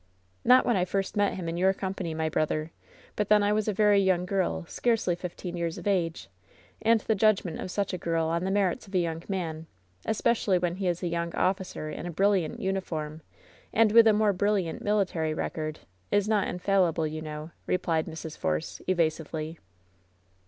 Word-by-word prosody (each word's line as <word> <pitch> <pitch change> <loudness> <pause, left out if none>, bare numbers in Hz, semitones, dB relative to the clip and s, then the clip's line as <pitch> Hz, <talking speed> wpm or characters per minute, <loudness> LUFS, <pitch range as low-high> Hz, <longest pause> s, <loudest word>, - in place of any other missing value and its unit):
"Not 250 +2 +6
when 240 - +2
I 180 - +2
first 195 +3 -2
met 205 -1 +2
him 180 -3 -5
in 165 +1 -3
your 190 +2 +3
company, 190 -4 -4
my 160 0 0
brother; 155 0 -1 0.4
but 210 -1 -1
then 210 -1 +5
I 205 +1 +2
was 215 0 0
a - - +2
very 205 0 +4
young 185 -2 +2
girl, 180 - -1
scarcely 225 - 0
fif 175 0 -6
teen 180 -2 -6
years 170 -1 -2
of - - -9
age, 175 -5 0 0.5
and 225 0 +4
the 220 - +1
judgment 200 -5 +2
of - - -5
such 200 +1 -2
a 180 - -3
girl 165 -1 0
on 170 +2 0
the 190 - -1
merits 200 +3 0
of 190 - -8
a - - +5
young 165 -2 -1
man, 165 -4 -3 0.4
especially 220 -3 +2
when 175 0 -1
he 190 -1 -1
is 175 +1 -1
a - - 0
young 170 0 -2
officer 185 -4 -1
in 175 - -6
a - - -4
brilliant 190 -2 +1
uniform, 160 -5 -3 0.5
and 225 -1 +4
with 230 +1 +7
a - - +7
more 210 -1 +3
brilliant 195 -3 0
military 180 -7 0
record, 155 -1 -4 0.3
is 205 0 +2
not 210 -3 +2
infallible, 180 -3 +1
you 155 0 -4
know/' 155 +1 -7 0.2
replied 165 -3 0
Mrs. 160 -1 -7
Force, 80 0 -2
evasively. 160 -2 -1
180 Hz, 195 wpm, -28 LUFS, 165-200 Hz, 0.5 s, with